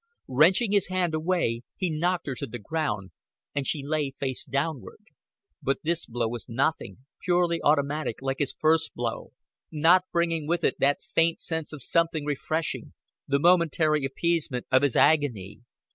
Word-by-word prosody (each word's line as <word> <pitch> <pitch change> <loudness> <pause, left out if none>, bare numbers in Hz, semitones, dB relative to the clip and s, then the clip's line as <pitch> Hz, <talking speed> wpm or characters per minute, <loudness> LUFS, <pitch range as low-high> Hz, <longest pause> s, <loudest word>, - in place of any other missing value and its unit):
Wrenching 175 - +4
his 200 -2 +3
hand 185 -3 -1
away 155 -8 0
he 185 -3 -2
knocked 175 +3 -1
her 140 - -3
to 125 - -5
the 120 - -7
ground, 110 - -3 0.4
and 140 -2 -2
she 140 -3 0
lay 150 -1 -1
face 135 -1 -3
downward. 140 0 -3 0.6
But 135 - 0
this 170 +1 0
blow 120 0 -1
was 120 0 -6
nothing, 125 -2 -2 0.2
purely 175 -2 +1
automatic, 145 -3 +1
like 135 0 -3
his 145 -3 0
first 160 +1 +2
blow, 120 -1 -4 0.4
not 170 +4 +4
bringing 165 -3 0
with 170 +1 0
it - - +1
that 140 +1 +2
faint 165 0 +1
sense 160 -2 -2
of 150 -5 -7
something 165 -1 +1
refreshing, 155 +2 -2 0.3
the 140 - +2
momentary 165 -3 +3
appeasement 140 -2 -1
of 130 0 +5
his 140 -4 +1
agony. 140 -11 +2
155 Hz, 160 wpm, -26 LUFS, 135-170 Hz, 0.6 s, of